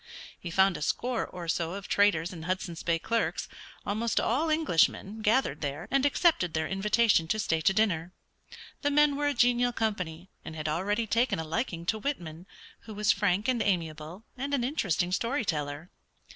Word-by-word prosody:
He 175 Hz, -, -6 dB
found 190 Hz, +1 st, +3 dB
a -, -, -9 dB
score 245 Hz, +9 st, -1 dB
or 175 Hz, -2 st, -8 dB
so 165 Hz, +1 st, -1 dB
of 200 Hz, -1 st, -7 dB
traders 185 Hz, -4 st, +2 dB
and 165 Hz, -2 st, -8 dB
Hudson's 180 Hz, -2 st, -3 dB
Bay 170 Hz, -1 st, +1 dB
clerks, 230 Hz, +7 st, -1 dB, 0.4 s
almost 220 Hz, +3 st, 0 dB
all 290 Hz, +8 st, +1 dB
Englishmen, 220 Hz, -, +1 dB
gathered 230 Hz, +6 st, +1 dB
there, 145 Hz, +3 st, -4 dB
and 275 Hz, +1 st, +3 dB
accepted 280 Hz, -, +2 dB
their 160 Hz, 0 st, 0 dB
invitation 205 Hz, -2 st, +2 dB
to 215 Hz, -, 0 dB
stay 165 Hz, -6 st, 0 dB
to 195 Hz, -, +4 dB
dinner. 185 Hz, -5 st, 0 dB, 0.7 s
The 290 Hz, -, +1 dB
men 295 Hz, 0 st, +4 dB
were 290 Hz, +1 st, 0 dB
a 290 Hz, -, 0 dB
genial 245 Hz, +1 st, +3 dB
company, 190 Hz, -7 st, -3 dB
and 160 Hz, -, -8 dB
had 155 Hz, -1 st, -4 dB
already 205 Hz, +8 st, 0 dB
taken 230 Hz, +4 st, +1 dB
a 160 Hz, -, -3 dB
liking 170 Hz, 0 st, -3 dB
to 220 Hz, +4 st, 0 dB
Whitman, 180 Hz, -, -5 dB, 0.4 s
who 220 Hz, -, -8 dB
was 210 Hz, +1 st, +3 dB
frank 200 Hz, +1 st, +1 dB
and 250 Hz, -3 st, +1 dB
amiable, 165 Hz, -1 st, -2 dB
and 275 Hz, +2 st, -2 dB
an 250 Hz, -, -1 dB
interesting 185 Hz, -, 0 dB
story 235 Hz, +6 st, 0 dB
teller. 150 Hz, -1 st, -3 dB
200 Hz, 180 wpm, -29 LUFS, 165-235 Hz, 0.7 s, to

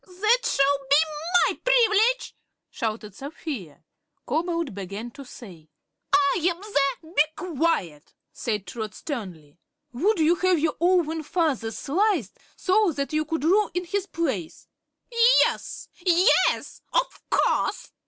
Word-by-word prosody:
"That 425 Hz, +7 st, +1 dB
shall 275 Hz, 0 st, +2 dB
be 280 Hz, -, +6 dB, 0.5 s
my -, -, -2 dB
privilege!" 485 Hz, 0 st, +3 dB, 0.4 s
shouted 215 Hz, -2 st, -4 dB
Sapphire. 270 Hz, -, -7 dB, 0.4 s
Cobalt 335 Hz, -, -1 dB
began 200 Hz, +4 st, -6 dB
to 275 Hz, -, -11 dB
say: 180 Hz, -, -13 dB, 0.4 s
"I'm 375 Hz, -1 st, +3 dB, 0.2 s
the 410 Hz, -7 st, 0 dB
" -, -, -14 dB
"Be 290 Hz, -, +6 dB
quiet!" 310 Hz, -, -2 dB, 0.2 s
said 210 Hz, -4 st, -3 dB
Trot, 215 Hz, +3 st, -6 dB
sternly. 180 Hz, -, -7 dB, 0.3 s
"Would 385 Hz, -, +1 dB
you 320 Hz, +1 st, +4 dB
have 370 Hz, -1 st, +2 dB
your 315 Hz, 0 st, 0 dB
own 335 Hz, -2 st, +2 dB
father 300 Hz, -7 st, -1 dB
sliced, 325 Hz, -, -1 dB, 0.2 s
so 400 Hz, 0 st, +2 dB
that 280 Hz, +1 st, -4 dB
you 310 Hz, 0 st, +1 dB
could 320 Hz, -1 st, -3 dB
rule 395 Hz, +6 st, +3 dB
in 360 Hz, 0 st, -1 dB
his 395 Hz, +2 st, -2 dB
place?" 260 Hz, -, -4 dB, 0.7 s
"Yes, -, -, -1 dB, 0.2 s
yes; 360 Hz, +3 st, +2 dB
of -, -, -1 dB
course!" -, -, 0 dB
315 Hz, 125 wpm, -25 LUFS, 230-370 Hz, 0.7 s, be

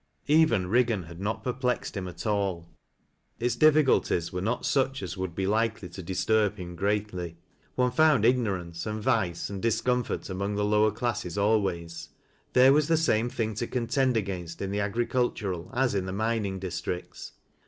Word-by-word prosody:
Eyen 160 Hz, +2 st, +6 dB, 0.3 s
Higgan 120 Hz, -6 st, +2 dB
had 85 Hz, +1 st, -11 dB
not 105 Hz, +2 st, -2 dB
perplexed 125 Hz, -1 st, -2 dB
him 95 Hz, -2 st, -3 dB
at 90 Hz, -, -8 dB
all. 100 Hz, -5 st, -1 dB, 0.7 s
Its 120 Hz, 0 st, 0 dB
difficul 155 Hz, +1 st, +5 dB
1 -, -, +3 dB
ies 85 Hz, +1 st, -6 dB
were 90 Hz, -, -2 dB
not 115 Hz, +6 st, -1 dB
such 135 Hz, -3 st, +1 dB
as 90 Hz, 0 st, -5 dB
would 95 Hz, -3 st, -4 dB
be 95 Hz, -, -1 dB
likely 110 Hz, -1 st, 0 dB
to 95 Hz, -, -8 dB
disturb 105 Hz, +3 st, +1 dB
him 90 Hz, -2 st, -7 dB
greatly, 95 Hz, -3 st, -2 dB, 0.4 s
One 125 Hz, -1 st, +2 dB
f(. 125 Hz, -, -9 dB
und 150 Hz, -8 st, +5 dB
ignorance, 95 Hz, -8 st, 0 dB
and 110 Hz, 0 st, -3 dB
vice, 105 Hz, -7 st, 0 dB
and 100 Hz, -1 st, -5 dB
discomfort 120 Hz, +2 st, 0 dB
among 100 Hz, +2 st, -3 dB
the 105 Hz, 0 st, 0 dB
ii.wer 105 Hz, +1 st, +4 dB
classes 105 Hz, -4 st, -3 dB
always; 90 Hz, -6 st, 0 dB, 0.4 s
there 130 Hz, +2 st, +7 dB
was 150 Hz, 0 st, +3 dB
the 165 Hz, -1 st, +3 dB
same 120 Hz, -7 st, +2 dB
thing 110 Hz, -2 st, -2 dB
to 115 Hz, +3 st, -3 dB
contend 125 Hz, +1 st, +1 dB
against 90 Hz, -5 st, -4 dB
in 100 Hz, -1 st, -3 dB
the 100 Hz, -, -1 dB
agricultural 105 Hz, -4 st, -1 dB
as 130 Hz, -2 st, +1 dB
in 95 Hz, -2 st, -1 dB
the 95 Hz, -, -4 dB
mining 110 Hz, -2 st, -1 dB
districts. 90 Hz, -1 st, -5 dB
105 Hz, 175 wpm, -27 LUFS, 95-120 Hz, 0.7 s, there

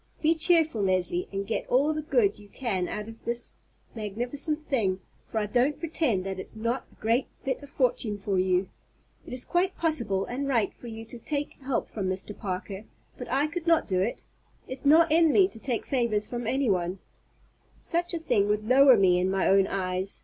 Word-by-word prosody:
Be 315 Hz, +1 st, +3 dB
cheerful, 320 Hz, -, +3 dB
Leslie, 185 Hz, -2 st, 0 dB
and 195 Hz, 0 st, -3 dB
get 225 Hz, -, -3 dB
all 285 Hz, +5 st, +3 dB
the 310 Hz, -, -3 dB
good 400 Hz, -, +1 dB
you 205 Hz, -1 st, -15 dB
can 200 Hz, -7 st, -2 dB
out 210 Hz, 0 st, -5 dB
of 225 Hz, 0 st, -12 dB
this 235 Hz, 0 st, -3 dB, 0.4 s
magnificent 245 Hz, -, -3 dB
thing, 200 Hz, -10 st, 0 dB, 0.3 s
for -, -, -3 dB
I 215 Hz, -, +1 dB
don't 250 Hz, +7 st, +1 dB
pretend 305 Hz, -, 0 dB
that 190 Hz, -1 st, -4 dB
it's 190 Hz, -, -8 dB
not 230 Hz, +4 st, -2 dB
a -, -, -22 dB
great 230 Hz, +4 st, 0 dB, 0.2 s
bit 265 Hz, +1 st, -2 dB
of 285 Hz, -, -12 dB
fortune 240 Hz, -6 st, 0 dB
for 195 Hz, -1 st, -1 dB
you. 185 Hz, 0 st, +2 dB, 0.6 s
It -, -, -9 dB
is 250 Hz, 0 st, -3 dB
quite 365 Hz, +2 st, 0 dB
possible 235 Hz, -, 0 dB
and 275 Hz, +3 st, -3 dB
right 230 Hz, -7 st, +1 dB
for 240 Hz, -, -12 dB
you 225 Hz, 0 st, -7 dB
to 235 Hz, +1 st, -9 dB
take 290 Hz, +4 st, -3 dB
help 260 Hz, -3 st, -1 dB
from 195 Hz, -4 st, -3 dB
Mr. 190 Hz, +2 st, -4 dB
Parker; 195 Hz, +1 st, -5 dB, 0.3 s
but 250 Hz, -, -8 dB
I 270 Hz, +4 st, +2 dB
could 335 Hz, +2 st, -5 dB
not 330 Hz, -1 st, +3 dB
do 185 Hz, -2 st, 0 dB
it. 215 Hz, +5 st, -2 dB, 0.4 s
It's 260 Hz, +2 st, -4 dB
not 320 Hz, +2 st, +6 dB
in 325 Hz, 0 st, +5 dB
me 380 Hz, +3 st, +5 dB
to 225 Hz, -, -11 dB
take 240 Hz, -1 st, -2 dB
favors 235 Hz, -5 st, 0 dB
from 240 Hz, -2 st, -4 dB
anyone. 195 Hz, -9 st, 0 dB, 0.8 s
Such 345 Hz, +1 st, -1 dB
a -, -, 0 dB
thing 210 Hz, -11 st, +1 dB
would 210 Hz, +1 st, -1 dB
lower 260 Hz, 0 st, +7 dB
me 180 Hz, -2 st, +4 dB
in 185 Hz, +1 st, +1 dB
my 190 Hz, -1 st, +1 dB
own 195 Hz, 0 st, +4 dB
eyes. 185 Hz, 0 st, -2 dB
235 Hz, 200 wpm, -27 LUFS, 195-285 Hz, 0.8 s, lower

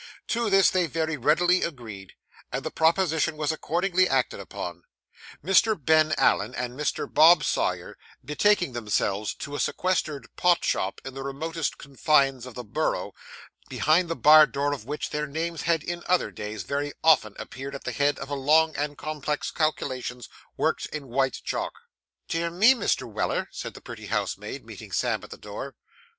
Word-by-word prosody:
To 235 Hz, -1 st, 0 dB
this 195 Hz, -1 st, +5 dB
they 180 Hz, -2 st, +1 dB
very 160 Hz, 0 st, -1 dB
readily 175 Hz, +7 st, +3 dB
agreed, 110 Hz, -, -6 dB, 0.4 s
and -, -, -3 dB
the -, -, -4 dB
proposition 160 Hz, -2 st, +2 dB
was 150 Hz, 0 st, 0 dB
accordingly 180 Hz, +3 st, +1 dB
acted 130 Hz, -2 st, 0 dB
upon; 85 Hz, 0 st, -7 dB, 0.6 s
Mr. 195 Hz, +2 st, +4 dB
Ben 155 Hz, +1 st, +3 dB
Allen 120 Hz, +4 st, +2 dB
and 125 Hz, 0 st, -3 dB
Mr. 150 Hz, +3 st, -2 dB
Bob 160 Hz, 0 st, +6 dB
Sawyer -, -, -1 dB, 0.3 s
betaking 175 Hz, +1 st, +2 dB
themselves 105 Hz, -2 st, -1 dB
to 145 Hz, -, -7 dB
a 145 Hz, -, -3 dB
sequestered 155 Hz, -8 st, -1 dB
pot 175 Hz, -1 st, +3 dB
shop 95 Hz, -, -1 dB
on 135 Hz, -, -6 dB
the 135 Hz, -, -7 dB
remotest 155 Hz, +4 st, -3 dB
confines 135 Hz, -2 st, +1 dB
of 125 Hz, -, -11 dB
the 125 Hz, -, -6 dB
Borough, 105 Hz, -, -2 dB, 0.6 s
behind 165 Hz, +3 st, +2 dB
the 165 Hz, -, -1 dB
bar 155 Hz, 0 st, +8 dB
door 145 Hz, +1 st, -1 dB
of 115 Hz, -7 st, -7 dB
which 150 Hz, +3 st, -4 dB
their 150 Hz, 0 st, -2 dB
names 160 Hz, +3 st, -3 dB
had 165 Hz, -3 st, +2 dB
in 175 Hz, +1 st, -4 dB
other 180 Hz, 0 st, +2 dB
days 105 Hz, -1 st, -6 dB
very 145 Hz, +7 st, -3 dB
often 135 Hz, -10 st, +4 dB
appeared 135 Hz, +1 st, -7 dB
at 140 Hz, -, -8 dB
the -, -, -3 dB
head 145 Hz, 0 st, +1 dB
of 135 Hz, +1 st, -7 dB
long 155 Hz, +3 st, +3 dB
and 145 Hz, 0 st, -3 dB
complex 150 Hz, -1 st, -3 dB
calculations 130 Hz, -6 st, -2 dB, 0.3 s
worked -, -, 0 dB
in 145 Hz, -4 st, -7 dB
white 135 Hz, +1 st, 0 dB
chalk. -, -, -3 dB, 0.5 s
'Dear 170 Hz, +1 st, -1 dB
me, 205 Hz, +9 st, +5 dB
Mr. 255 Hz, -, -1 dB
Weller,' -, -, -2 dB
said -, -, -7 dB
the -, -, -11 dB
pretty -, -, -9 dB
housemaid, -, -, -3 dB
meeting -, -, -10 dB
Sam -, -, 0 dB
at -, -, -11 dB
the -, -, -9 dB
door. -, -, -8 dB
150 Hz, 170 wpm, -26 LUFS, 135-170 Hz, 0.6 s, bar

